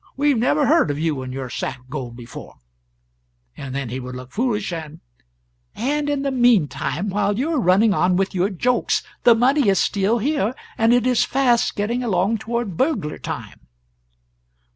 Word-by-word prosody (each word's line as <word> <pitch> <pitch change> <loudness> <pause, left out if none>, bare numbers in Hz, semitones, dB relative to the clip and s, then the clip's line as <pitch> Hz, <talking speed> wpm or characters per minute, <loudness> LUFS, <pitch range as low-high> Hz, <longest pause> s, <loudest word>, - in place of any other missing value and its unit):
We 290 +2 +2
have 250 - +1
never 290 +5 +2
heard 310 - +3
of 145 - -2
you 155 -3 -1
and 130 0 -6
your 130 0 -5
sack 125 +1 -4
of 125 - -25
gold 125 -5 -5
before;' 120 -1 -10 1.0
and 135 -1 -7
then 140 -3 -3
he 130 +3 -4
would 125 0 -7
look 130 0 -9
foolish, 210 - -1
and 155 -2 -7 0.4
" - - -46
"And 290 +5 -1
in 285 -1 -1
the 275 - 0
meantime, 210 - +1
while 205 +1 0
you 285 +7 -1
are 300 - +1
running 200 +1 +4
on 180 0 +2
with 195 0 0
your 185 +1 +1
jokes, 245 +6 0 0.2
the 235 - +7
money 255 +1 +3
is 195 - +3
still 200 +5 +1
here, 245 -2 0 0.2
and 225 +1 +3
it 245 -1 +3
is 250 -2 +3
fast 250 -3 +1
getting 230 +5 -1
along 205 0 +1
toward 225 -5 -3
burglar 245 - -1
time." - - -7
205 Hz, 185 wpm, -21 LUFS, 150-245 Hz, 1.0 s, the